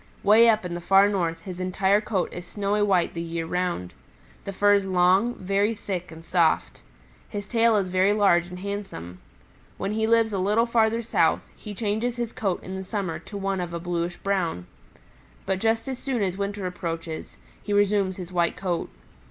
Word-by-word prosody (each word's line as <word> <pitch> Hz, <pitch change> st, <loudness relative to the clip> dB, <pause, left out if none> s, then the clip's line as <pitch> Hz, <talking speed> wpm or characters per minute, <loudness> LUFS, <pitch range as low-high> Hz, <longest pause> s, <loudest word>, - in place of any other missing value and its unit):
Way 220 Hz, +3 st, +7 dB
up 215 Hz, -3 st, +2 dB
in 175 Hz, -, -4 dB
the 175 Hz, -, -4 dB
Far 195 Hz, +3 st, +5 dB
North 170 Hz, -5 st, -1 dB
his 185 Hz, -1 st, -7 dB
entire 190 Hz, +2 st, +2 dB
coat 205 Hz, -4 st, -2 dB
is 175 Hz, 0 st, -8 dB
snowy 205 Hz, +1 st, -1 dB
white 190 Hz, -4 st, +2 dB
the 170 Hz, -, -4 dB
year 165 Hz, 0 st, -3 dB
round. 175 Hz, -, -2 dB, 0.5 s
The -, -, -3 dB
fur 205 Hz, +1 st, +4 dB
is 200 Hz, -1 st, +2 dB
long, 190 Hz, +6 st, +3 dB
very 200 Hz, +4 st, 0 dB
thick 180 Hz, -4 st, -5 dB
and 165 Hz, 0 st, -12 dB
soft. 170 Hz, -2 st, +1 dB, 0.5 s
His 205 Hz, -1 st, -5 dB
tail 230 Hz, -1 st, +3 dB
is 195 Hz, -2 st, 0 dB
very 185 Hz, +2 st, +3 dB
large 195 Hz, -5 st, +3 dB
and 180 Hz, 0 st, -8 dB
handsome. 190 Hz, -, -6 dB, 0.6 s
When 200 Hz, -, -2 dB
he 220 Hz, +1 st, 0 dB
lives 225 Hz, -1 st, +3 dB
a 195 Hz, -, 0 dB
little 210 Hz, +5 st, +2 dB
farther 230 Hz, -1 st, +2 dB
south, 230 Hz, -, +2 dB
he 210 Hz, -2 st, -9 dB
changes 220 Hz, +3 st, -1 dB
his 240 Hz, -2 st, -4 dB
coat 195 Hz, -4 st, -2 dB
in 185 Hz, -, -6 dB
the 190 Hz, -, -5 dB
summer 190 Hz, -4 st, -3 dB
to 205 Hz, -, -9 dB
one 195 Hz, -1 st, -1 dB
of 170 Hz, -1 st, -4 dB
a -, -, -3 dB
bluish 175 Hz, 0 st, -3 dB
brown. 180 Hz, -, -1 dB, 0.8 s
But 190 Hz, -1 st, 0 dB
just 225 Hz, +3 st, 0 dB
as 260 Hz, -2 st, -4 dB
soon 255 Hz, -6 st, -1 dB
as 185 Hz, -2 st, -1 dB
winter 200 Hz, 0 st, -3 dB
approaches, 165 Hz, -3 st, -5 dB, 0.2 s
he 205 Hz, -, -6 dB
resumes 205 Hz, -2 st, +2 dB
his 180 Hz, -1 st, -7 dB
white 170 Hz, -1 st, +1 dB
coat. 180 Hz, -3 st, -2 dB
195 Hz, 195 wpm, -25 LUFS, 180-210 Hz, 0.8 s, Way